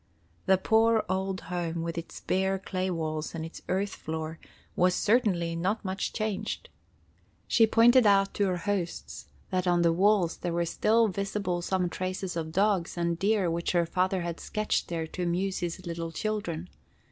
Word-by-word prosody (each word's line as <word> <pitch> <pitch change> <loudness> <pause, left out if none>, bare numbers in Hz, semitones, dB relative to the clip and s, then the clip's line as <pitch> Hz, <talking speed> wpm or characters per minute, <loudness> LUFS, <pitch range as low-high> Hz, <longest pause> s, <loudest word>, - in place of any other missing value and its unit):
The 190 - +6
poor 225 +3 +3
old 190 0 -1
home 170 -1 -3
with 165 0 -3
its 170 0 -7
bare 190 +1 +1
clay 190 0 -3
walls 155 -2 -3
and 160 -1 -4
its 165 - -9
earth 195 +2 0
floor 160 0 -5 0.4
was 180 0 +3
certainly 190 -7 +2
not 190 +6 -1
much 190 +1 -2
changed. 215 -3 -3 0.8
She 225 -2 +5
pointed 235 +1 +6
out 195 -1 +4
to 205 - +1
her 180 -1 0
hosts 185 -2 -3 0.2
that 185 -1 0
on 175 -1 +3
the 165 -1 +4
walls 190 -1 +3
there 175 -1 -3
were 170 0 +1
still 225 +6 +3
visible 195 -2 -2
some 180 0 0
traces 185 +1 -3
of 160 -1 -3
dogs 190 -1 +1
and 170 -1 0
deer 200 -3 +2
which 170 +2 -1
her 170 -1 +3
father 185 +2 0
had 170 -1 -4
sketched 215 0 -1
there 165 -2 -2
to 160 - -7
amuse 180 +2 0
his 175 +1 -4
little 165 -1 -4
children. 180 -3 -3
185 Hz, 170 wpm, -28 LUFS, 170-200 Hz, 0.8 s, The